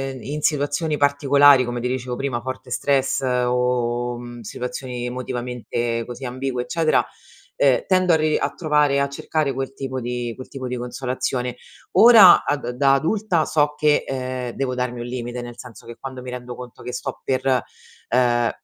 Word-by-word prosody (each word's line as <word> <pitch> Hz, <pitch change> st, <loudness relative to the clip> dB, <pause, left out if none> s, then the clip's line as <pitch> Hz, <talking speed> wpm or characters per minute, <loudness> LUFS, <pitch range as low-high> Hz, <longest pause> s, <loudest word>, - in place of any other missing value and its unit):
uhm, 130 Hz, -, -10 dB
in 150 Hz, +3 st, -5 dB
situazioni 150 Hz, +1 st, 0 dB
particolari, 140 Hz, -1 st, +5 dB
come 120 Hz, -1 st, -4 dB
ti 125 Hz, -, -1 dB
dicevo 125 Hz, -1 st, -3 dB
prima, 125 Hz, -3 st, -2 dB
forte 130 Hz, 0 st, -6 dB
stress 135 Hz, +2 st, +1 dB
o, 125 Hz, -1 st, 0 dB
mhmm, 120 Hz, -1 st, -9 dB
situazioni 125 Hz, +2 st, -5 dB
emotivamente, 120 Hz, -1 st, -3 dB
così, 125 Hz, +2 st, -8 dB
ambigue, 125 Hz, 0 st, -3 dB
eccetera, 155 Hz, +5 st, +1 dB, 0.5 s
uhm, 135 Hz, -3 st, +3 dB
tendo 185 Hz, -2 st, +3 dB
a -, -, +6 dB
ri 155 Hz, 0 st, +1 dB
a -, -, 0 dB
trovare 150 Hz, -3 st, +2 dB
a 140 Hz, -, +1 dB
cercare 145 Hz, +1 st, -1 dB
quel 135 Hz, +1 st, -4 dB
tipo 130 Hz, -1 st, -4 dB
di 120 Hz, -1 st, -3 dB
quel 130 Hz, -, -10 dB
tipo 130 Hz, -2 st, -6 dB
di 125 Hz, -, -3 dB
consolazione. 125 Hz, 0 st, -3 dB, 0.4 s
Ora, 225 Hz, -5 st, +8 dB
a 145 Hz, -, +1 dB
da 125 Hz, -3 st, -5 dB
da 135 Hz, +2 st, +3 dB
adulta 170 Hz, +3 st, +1 dB
so 150 Hz, -1 st, +1 dB
che, 150 Hz, 0 st, +2 dB
ehm, 130 Hz, -2 st, -3 dB
devo 130 Hz, -2 st, -2 dB
darmi 125 Hz, -1 st, -3 dB
un 120 Hz, -, -5 dB
limite, 120 Hz, 0 st, -5 dB
nel 120 Hz, 0 st, -9 dB
senso 120 Hz, -3 st, -12 dB
che 120 Hz, -, -8 dB
quando 130 Hz, -1 st, -8 dB
mi 125 Hz, -, -8 dB
rendo 125 Hz, 0 st, -7 dB
conto 125 Hz, -1 st, -11 dB
che 125 Hz, -, -6 dB
sto 135 Hz, +1 st, -5 dB
per, 130 Hz, -2 st, +1 dB, 0.5 s
ehm, 120 Hz, -1 st, +2 dB
130 Hz, 175 wpm, -22 LUFS, 125-140 Hz, 0.5 s, Ora